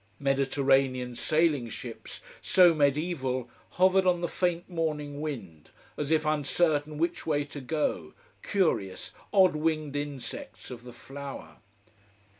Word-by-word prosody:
Mediterranean 135 Hz, -2 st, +1 dB
sailing 155 Hz, -3 st, +1 dB
ships, -, -, -8 dB, 0.2 s
so 180 Hz, -2 st, +6 dB
mediaeval, 140 Hz, -4 st, 0 dB, 0.2 s
hovered 185 Hz, +1 st, +4 dB
on 175 Hz, -1 st, +3 dB
the 175 Hz, -, 0 dB
faint 175 Hz, -1 st, -1 dB
morning 150 Hz, -4 st, -3 dB
wind, 95 Hz, -, -6 dB, 0.3 s
as 145 Hz, -1 st, -3 dB
if 160 Hz, -1 st, +2 dB
uncertain 150 Hz, 0 st, +1 dB
which 170 Hz, +2 st, -1 dB
way 145 Hz, -2 st, +1 dB
to 145 Hz, 0 st, -8 dB
go, 125 Hz, -, -2 dB, 0.3 s
curious, 155 Hz, -, 0 dB, 0.2 s
odd 190 Hz, -5 st, +5 dB
winged 155 Hz, -2 st, -1 dB
insects 145 Hz, -4 st, -6 dB
of 120 Hz, -1 st, -9 dB
the 125 Hz, -, -10 dB
flower. 140 Hz, +2 st, -9 dB
145 Hz, 120 wpm, -28 LUFS, 135-165 Hz, 0.3 s, so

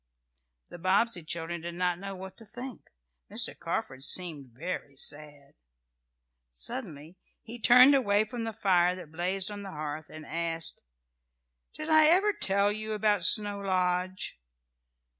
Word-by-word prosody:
The 175 Hz, -, -9 dB
Bobbsey 185 Hz, +1 st, +1 dB
children 165 Hz, +1 st, -4 dB
did 170 Hz, +1 st, -6 dB
not 180 Hz, -1 st, 0 dB
know 195 Hz, 0 st, -6 dB
what 190 Hz, 0 st, -9 dB
to 225 Hz, -, -11 dB
think. 245 Hz, +3 st, -9 dB, 0.4 s
Mr. -, -, -1 dB
Carford 130 Hz, 0 st, -4 dB
seemed 155 Hz, -6 st, +1 dB
very 145 Hz, +1 st, -6 dB
sad. 145 Hz, 0 st, -4 dB, 1.0 s
Suddenly 155 Hz, -, -6 dB, 0.2 s
he 235 Hz, +1 st, -9 dB
turned 250 Hz, +4 st, +8 dB
away 215 Hz, -6 st, +3 dB
from 230 Hz, +1 st, -5 dB
the 225 Hz, -, -3 dB
fire 180 Hz, -4 st, +2 dB
that 175 Hz, -4 st, -10 dB
blazed 185 Hz, +4 st, -1 dB
on 205 Hz, 0 st, -6 dB
the 200 Hz, -, -7 dB
hearth, 150 Hz, -2 st, -6 dB
and 155 Hz, 0 st, -10 dB
asked: 165 Hz, -, -1 dB, 0.9 s
"Did 310 Hz, +1 st, -4 dB
I 310 Hz, -1 st, +7 dB
ever 385 Hz, +6 st, +4 dB
tell 200 Hz, -, +2 dB
you 215 Hz, +1 st, -3 dB
about 210 Hz, -3 st, +2 dB
Snow 205 Hz, +1 st, +3 dB
Lodge?" 185 Hz, -, -1 dB
185 Hz, 140 wpm, -29 LUFS, 165-215 Hz, 1.0 s, turned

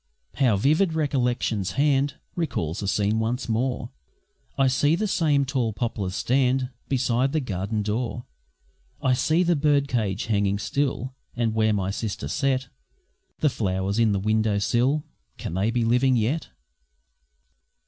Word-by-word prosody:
How 125 Hz, -7 st, +3 dB
vivid 155 Hz, -, +2 dB
Recollection's 125 Hz, -, 0 dB
hand 140 Hz, 0 st, +2 dB, 0.2 s
Recalls 100 Hz, -, -2 dB
the 100 Hz, -, -3 dB
scene 105 Hz, +3 st, +1 dB
once 120 Hz, +3 st, -1 dB
more! 120 Hz, +1 st, -1 dB, 0.7 s
I 135 Hz, -, +4 dB
see 145 Hz, +4 st, +3 dB
the 210 Hz, +5 st, -1 dB
same 150 Hz, -7 st, +2 dB
tall 125 Hz, -5 st, -1 dB
poplars 105 Hz, -5 st, -3 dB
stand 130 Hz, +3 st, +1 dB, 0.2 s
Beside 130 Hz, 0 st, +1 dB
the 155 Hz, -, +2 dB
garden 105 Hz, -3 st, -2 dB
door; 120 Hz, +3 st, -2 dB, 0.7 s
I 130 Hz, -, +2 dB
see 160 Hz, +7 st, +2 dB
the 175 Hz, -1 st, +2 dB
bird 145 Hz, -1 st, +2 dB
cage 110 Hz, -7 st, -1 dB
hanging 100 Hz, -2 st, +1 dB
still; 130 Hz, +3 st, -2 dB, 0.2 s
And 115 Hz, -2 st, 0 dB
where 110 Hz, -1 st, +2 dB
my 95 Hz, -2 st, 0 dB
sister 105 Hz, 0 st, -4 dB
set 135 Hz, -1 st, 0 dB, 0.7 s
The 150 Hz, -, +4 dB
flowers 95 Hz, 0 st, -1 dB
in 115 Hz, -2 st, +4 dB
the 100 Hz, -, +1 dB
window 110 Hz, +1 st, +1 dB
sill 125 Hz, +8 st, +1 dB, 0.3 s
Can -, -, -5 dB
they 95 Hz, +5 st, +1 dB
be 115 Hz, 0 st, 0 dB
living 125 Hz, +3 st, +3 dB
yet? 125 Hz, +8 st, 0 dB
120 Hz, 145 wpm, -25 LUFS, 105-135 Hz, 0.7 s, I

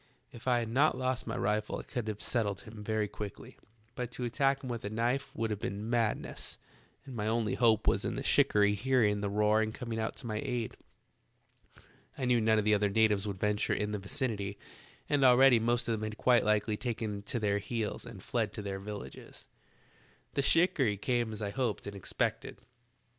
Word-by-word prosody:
If 120 Hz, +2 st, -11 dB
I 125 Hz, -1 st, +4 dB
had 115 Hz, -2 st, -2 dB
not 135 Hz, +3 st, +3 dB
lost 130 Hz, -1 st, -1 dB
my 115 Hz, +2 st, -3 dB
rifle 105 Hz, 0 st, 0 dB
I -, -, -6 dB
could 120 Hz, -5 st, -4 dB
have 105 Hz, -1 st, -4 dB
settled 105 Hz, -5 st, 0 dB
him 110 Hz, -3 st, -10 dB
very 110 Hz, 0 st, 0 dB
quickly, 100 Hz, -1 st, -8 dB, 0.4 s
but 125 Hz, -1 st, -4 dB
to 125 Hz, -, -4 dB
attack 135 Hz, +3 st, +1 dB
him -, -, -5 dB
with 120 Hz, -1 st, -4 dB
a 100 Hz, -, -3 dB
knife 120 Hz, +5 st, -1 dB
would 115 Hz, -1 st, -1 dB
have 105 Hz, -, -2 dB
been 105 Hz, +3 st, -4 dB
madness, 115 Hz, -3 st, -1 dB, 0.5 s
and 135 Hz, -3 st, -8 dB
my 105 Hz, -1 st, -2 dB
only 110 Hz, -2 st, +1 dB
hope 115 Hz, -3 st, +3 dB
was -, -, +2 dB
in -, -, -2 dB
the -, -, -3 dB
shikarry 105 Hz, 0 st, +4 dB
hearing 105 Hz, -2 st, +2 dB
the 100 Hz, -, -1 dB
roar 105 Hz, +1 st, +3 dB
and 110 Hz, 0 st, -2 dB
coming 115 Hz, -3 st, -4 dB
to 110 Hz, +2 st, -4 dB
my 110 Hz, -2 st, -2 dB
aid. 120 Hz, -3 st, -3 dB, 1.4 s
I 130 Hz, -, -2 dB
knew 125 Hz, -2 st, +3 dB
none 110 Hz, 0 st, +4 dB
of 105 Hz, -, +1 dB
the 105 Hz, -, +4 dB
other 105 Hz, 0 st, +3 dB
natives 105 Hz, -1 st, +3 dB
would 100 Hz, -2 st, -4 dB
venture 105 Hz, 0 st, +1 dB
in 105 Hz, 0 st, -1 dB
the 105 Hz, -, -2 dB
vicinity, 100 Hz, -3 st, -3 dB, 0.5 s
and 145 Hz, -2 st, +2 dB
already 125 Hz, -1 st, +7 dB
the 110 Hz, -, -2 dB
most 120 Hz, 0 st, +1 dB
of -, -, +1 dB
them 110 Hz, -1 st, -1 dB
had 110 Hz, 0 st, -4 dB
quite 125 Hz, -2 st, +4 dB
likely 105 Hz, 0 st, +1 dB
taken 110 Hz, -4 st, -3 dB
to 105 Hz, +4 st, -3 dB
their 100 Hz, -2 st, +1 dB
heels 110 Hz, +1 st, -3 dB
and -, -, -10 dB
fled -, -, -1 dB
to 105 Hz, -, -6 dB
their 100 Hz, -1 st, -4 dB
villages. 100 Hz, -8 st, -8 dB, 0.9 s
"The 140 Hz, -, +1 dB
shikarry 135 Hz, -, +3 dB
came 120 Hz, +1 st, 0 dB
as 110 Hz, 0 st, -5 dB
I 100 Hz, -, -2 dB
hoped 120 Hz, -1 st, -2 dB
and 100 Hz, 0 st, -6 dB
expected. 100 Hz, -, -2 dB
110 Hz, 205 wpm, -31 LUFS, 105-120 Hz, 1.4 s, already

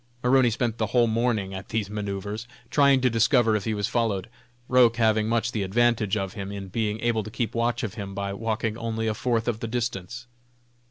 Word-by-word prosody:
Maroney 125 Hz, 0 st, +5 dB
spent 115 Hz, 0 st, -2 dB
the 110 Hz, -, +1 dB
whole 120 Hz, +3 st, +3 dB
morning 110 Hz, -4 st, 0 dB
at 95 Hz, -, -7 dB
these 110 Hz, -2 st, -1 dB
manoeuvres, 105 Hz, +1 st, -4 dB, 0.2 s
trying 140 Hz, -2 st, +5 dB
to 130 Hz, -, +3 dB
discover 115 Hz, 0 st, +3 dB
if 105 Hz, -, -2 dB
he 110 Hz, -, 0 dB
was 105 Hz, -1 st, -1 dB
followed, 115 Hz, -3 st, -1 dB, 0.4 s
Roch 125 Hz, -2 st, +5 dB
having 110 Hz, -2 st, +2 dB
much 115 Hz, 0 st, +1 dB
the 110 Hz, -, -2 dB
advantage 110 Hz, +1 st, +2 dB
of 95 Hz, -2 st, -3 dB
him, 100 Hz, -2 st, -6 dB
in 100 Hz, -1 st, -6 dB
being 110 Hz, +1 st, -1 dB
able 115 Hz, -2 st, +1 dB
to 110 Hz, -, -7 dB
keep 115 Hz, +1 st, -3 dB
watch 120 Hz, +1 st, 0 dB
of 105 Hz, -5 st, -3 dB
him 100 Hz, -3 st, -6 dB
by 100 Hz, 0 st, -3 dB
walking 110 Hz, +1 st, -2 dB
only 115 Hz, -1 st, -2 dB
a 110 Hz, -, +1 dB
fourth 115 Hz, +1 st, -1 dB
of 115 Hz, -2 st, -1 dB
the 115 Hz, -, -4 dB
distance. 120 Hz, -1 st, -4 dB
110 Hz, 210 wpm, -25 LUFS, 105-120 Hz, 0.4 s, Maroney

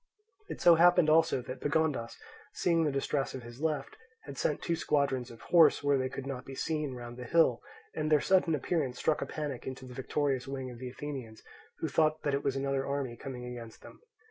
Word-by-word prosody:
It -, -, -6 dB
so 175 Hz, -, +8 dB
happened 175 Hz, -1 st, +5 dB
also 155 Hz, -5 st, +3 dB
that 130 Hz, +2 st, -7 dB
Pagondas, 145 Hz, -6 st, 0 dB, 0.4 s
seeing 165 Hz, -2 st, +2 dB
the 150 Hz, -, +1 dB
distress 135 Hz, 0 st, -1 dB
of 130 Hz, -, -7 dB
his 120 Hz, +3 st, -11 dB
left, 155 Hz, -2 st, -2 dB, 0.3 s
had 140 Hz, -, -9 dB
sent 150 Hz, -, -1 dB
two 170 Hz, -, 0 dB
squadrons 140 Hz, -5 st, 0 dB
of 115 Hz, -1 st, -13 dB
horse, 165 Hz, -5 st, +5 dB
where 145 Hz, -1 st, +3 dB
they 130 Hz, 0 st, -1 dB
could 135 Hz, 0 st, -6 dB
not 135 Hz, -2 st, -5 dB
be 135 Hz, -, -9 dB
seen, 150 Hz, -2 st, -2 dB
round 120 Hz, 0 st, -8 dB
the 125 Hz, -, -6 dB
hill, 130 Hz, -4 st, +3 dB, 0.3 s
and 155 Hz, 0 st, -2 dB
their 150 Hz, -, +6 dB
sudden 180 Hz, -1 st, +3 dB
appearance 140 Hz, -3 st, -1 dB
struck 155 Hz, -, +1 dB
a -, -, -2 dB
panic 145 Hz, -5 st, -5 dB
into 130 Hz, 0 st, -6 dB
the 125 Hz, -, -10 dB
victorious 135 Hz, 0 st, -1 dB
wing 130 Hz, -2 st, -5 dB
of 120 Hz, -, -11 dB
the 130 Hz, 0 st, -5 dB
Athenians, 130 Hz, -4 st, -7 dB, 0.4 s
who -, -, 0 dB
thought 155 Hz, 0 st, +1 dB
that 145 Hz, -, 0 dB
it 140 Hz, -, 0 dB
was 135 Hz, -1 st, 0 dB
another 135 Hz, 0 st, 0 dB
army 140 Hz, -3 st, -3 dB
coming 125 Hz, -1 st, -7 dB
against 120 Hz, -2 st, -9 dB
them. -, -, -14 dB
140 Hz, 215 wpm, -31 LUFS, 125-155 Hz, 0.4 s, so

